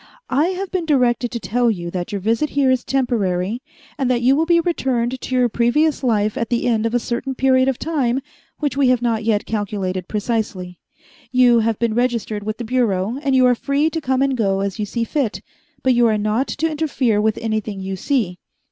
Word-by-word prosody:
"I 285 Hz, +6 st, +3 dB
have 375 Hz, +1 st, -4 dB
been 355 Hz, -4 st, -2 dB
directed 245 Hz, -4 st, +2 dB
to 235 Hz, -, -4 dB
tell 235 Hz, +5 st, +1 dB
you 175 Hz, -5 st, -3 dB
that 175 Hz, -1 st, -4 dB
your 200 Hz, -, -2 dB
visit 230 Hz, +9 st, 0 dB
here 275 Hz, -2 st, +2 dB
is 255 Hz, -1 st, +1 dB
temporary, 225 Hz, -5 st, -1 dB, 0.4 s
and 265 Hz, -2 st, +1 dB
that 240 Hz, -1 st, +1 dB
you 260 Hz, +3 st, +5 dB
will 320 Hz, +3 st, +1 dB
be 340 Hz, -1 st, +4 dB
returned 260 Hz, -7 st, -1 dB
to 260 Hz, -, -3 dB
your 250 Hz, -1 st, +4 dB
previous 270 Hz, +7 st, +1 dB
life 215 Hz, -4 st, +1 dB
at 230 Hz, -, -2 dB
the 240 Hz, -1 st, 0 dB
end 230 Hz, -2 st, +1 dB
of 230 Hz, -, -2 dB
a -, -, +3 dB
certain 245 Hz, +3 st, -3 dB
period 260 Hz, 0 st, +3 dB
of 265 Hz, -2 st, 0 dB
time 270 Hz, -6 st, 0 dB, 0.4 s
which 290 Hz, -4 st, -2 dB
we 275 Hz, -1 st, +3 dB
have 250 Hz, -1 st, +2 dB
not 225 Hz, -2 st, 0 dB
yet 215 Hz, -2 st, +1 dB
calculated 195 Hz, -4 st, -3 dB
precisely. 205 Hz, -5 st, -3 dB, 0.5 s
You 245 Hz, -2 st, +5 dB
have 225 Hz, -1 st, 0 dB
been 235 Hz, -2 st, 0 dB
registered 235 Hz, -3 st, -1 dB
with 215 Hz, +1 st, -4 dB
the 240 Hz, -, -5 dB
Bureau, 230 Hz, -2 st, 0 dB
and 275 Hz, -3 st, +1 dB
you 255 Hz, -1 st, +5 dB
are 250 Hz, -, +5 dB
free 280 Hz, +6 st, 0 dB
to 325 Hz, -, -3 dB
come 265 Hz, -1 st, +1 dB
and 275 Hz, -1 st, +1 dB
go 195 Hz, -5 st, 0 dB
as 200 Hz, +2 st, -3 dB
you 210 Hz, -, -2 dB
see 235 Hz, +3 st, -2 dB
fit, 250 Hz, -3 st, -1 dB, 0.4 s
but 260 Hz, -, +4 dB
you 240 Hz, -1 st, +4 dB
are 215 Hz, -1 st, +2 dB
not 215 Hz, +5 st, 0 dB
to 320 Hz, +3 st, -1 dB
interfere 270 Hz, -8 st, 0 dB
with 220 Hz, 0 st, +1 dB
anything 215 Hz, -3 st, -3 dB
you 190 Hz, 0 st, -4 dB
see. 190 Hz, -5 st, -1 dB
240 Hz, 220 wpm, -20 LUFS, 215-265 Hz, 0.5 s, you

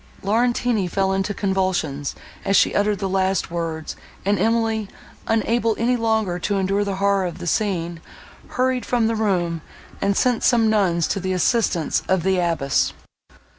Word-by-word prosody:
Laurentini 230 Hz, -1 st, +1 dB
fell 190 Hz, +2 st, 0 dB
into 195 Hz, +1 st, -1 dB
convulsions, 185 Hz, -8 st, -1 dB, 0.3 s
as 195 Hz, -, +1 dB
she -, -, +4 dB
uttered 205 Hz, 0 st, +1 dB
the 195 Hz, -, -2 dB
last 190 Hz, -1 st, 0 dB
words; 165 Hz, -2 st, -4 dB, 0.3 s
and 200 Hz, +1 st, +2 dB
Emily, 225 Hz, -2 st, +1 dB, 0.4 s
unable 225 Hz, 0 st, +1 dB
any 240 Hz, +2 st, +2 dB
longer 220 Hz, -6 st, 0 dB
to 200 Hz, +3 st, -1 dB
endure 195 Hz, +1 st, +1 dB
the 200 Hz, -1 st, -2 dB
horror 195 Hz, -1 st, +1 dB
of 175 Hz, -, -7 dB
the -, -, -7 dB
scene, 175 Hz, -3 st, -1 dB, 0.5 s
hurried 255 Hz, 0 st, 0 dB
from 240 Hz, -2 st, +1 dB
the 225 Hz, -, +1 dB
room, 175 Hz, -6 st, 0 dB, 0.4 s
and 200 Hz, 0 st, +1 dB
sent 245 Hz, -3 st, +2 dB
some 225 Hz, -3 st, +4 dB
nuns 180 Hz, -6 st, +2 dB
to -, -, -1 dB
the 185 Hz, 0 st, -2 dB
assistance 185 Hz, -4 st, +1 dB
of 190 Hz, -3 st, +1 dB
the 190 Hz, 0 st, +2 dB
abbess. 160 Hz, -6 st, +1 dB
195 Hz, 160 wpm, -22 LUFS, 180-220 Hz, 0.5 s, she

